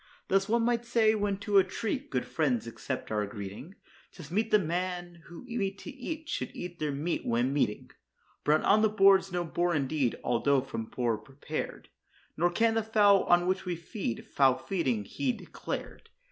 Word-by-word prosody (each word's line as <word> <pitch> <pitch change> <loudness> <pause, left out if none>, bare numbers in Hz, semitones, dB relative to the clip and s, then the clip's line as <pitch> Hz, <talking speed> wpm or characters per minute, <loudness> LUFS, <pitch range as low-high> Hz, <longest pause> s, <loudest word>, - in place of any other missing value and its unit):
Thus, 195 +1 +2
one 235 +1 +3
might 240 0 +1
say, 230 -2 +3
when 205 -2 0
to 205 -1 +4
a - - +5
treat 225 +8 -3
good 125 -3 -1
friends 130 -8 0
accept 125 +2 -5
our 105 -1 0
greeting, 105 - -8 0.4
'Tis 165 -3 -11
meet 215 +4 +1
that 215 - +6
men 175 0 -3
who 170 +5 -10
meet 210 -6 -3
to 310 - -8
eat 310 +4 -6
should - - -3
eat 175 -1 -7
their 150 -1 -1
meat 150 +5 -2
when 120 +3 +1
meeting. 135 -7 -1 0.5
Brawn 155 +1 +3
on 215 +2 +5
the 220 - +4
board's 195 -2 +5
no 175 0 -1
bore 175 +1 0
indeed 140 -3 0
although 135 +3 +2
from 115 -4 -5
boar 115 -1 -1
prepared; 135 +7 -6 0.5
Nor 175 +3 +2
can 225 +6 +2
the 225 - +2
fowl, 210 -3 +4
on 175 0 +4
which 190 +1 0
we 180 -1 -1
feed, 170 - -5
foul 130 -2 +3
feeding 130 - -1
he 260 - -1
declared. 240 - -7
175 Hz, 185 wpm, -29 LUFS, 135-210 Hz, 0.5 s, that